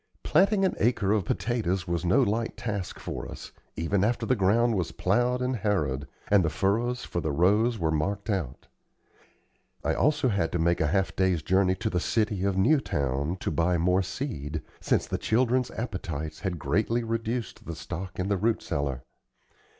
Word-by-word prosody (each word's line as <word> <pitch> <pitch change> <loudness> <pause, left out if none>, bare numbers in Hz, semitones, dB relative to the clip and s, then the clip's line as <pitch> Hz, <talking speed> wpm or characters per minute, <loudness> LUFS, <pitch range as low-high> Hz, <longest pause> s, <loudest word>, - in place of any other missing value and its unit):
Planting 195 +5 +3
an 185 - +1
acre 105 -4 +2
of 105 -4 +2
potatoes 95 -6 -1
was 85 -1 -1
no 105 +10 +4
light 115 +1 -1
task 100 -6 -4
for - - -6
us, - - -9 0.2
even 95 +5 0
after 115 +2 +1
the 130 - +2
ground 115 +4 +3
was 90 -4 -1
plowed 120 +6 +1
and 125 0 0
harrowed, 75 -10 -1 0.2
and 100 -2 +5
the 80 - +1
furrows 115 +9 0
for 85 - -3
the 80 -1 -1
rows 105 +9 +3
were 80 -5 0
marked 100 +8 -1
out. 90 - -3 1.2
I - - +1
also 150 -3 +2
had 100 -6 0
to - - +1
make 85 +1 +2
a 80 - +3
half 95 +4 0
day's 95 -4 +1
journey 95 +1 +3
to - - -2
the 90 - +1
city 105 0 0
of 100 -1 0
Newtown 90 - +1
to - - -1
buy 85 +1 +2
more 90 +3 +3
seed, 80 - -4 0.2
since - - +1
the - - -3
children's 125 +2 +2
appetites 80 - -5
had 95 -4 -3
greatly 110 +12 0
reduced 115 +1 -3
the 85 - -4
stock 90 +3 -6
in 90 - -1
the 100 -1 +1
root 110 +4 0
cellar. 70 -3 -2
95 Hz, 180 wpm, -27 LUFS, 85-115 Hz, 1.2 s, and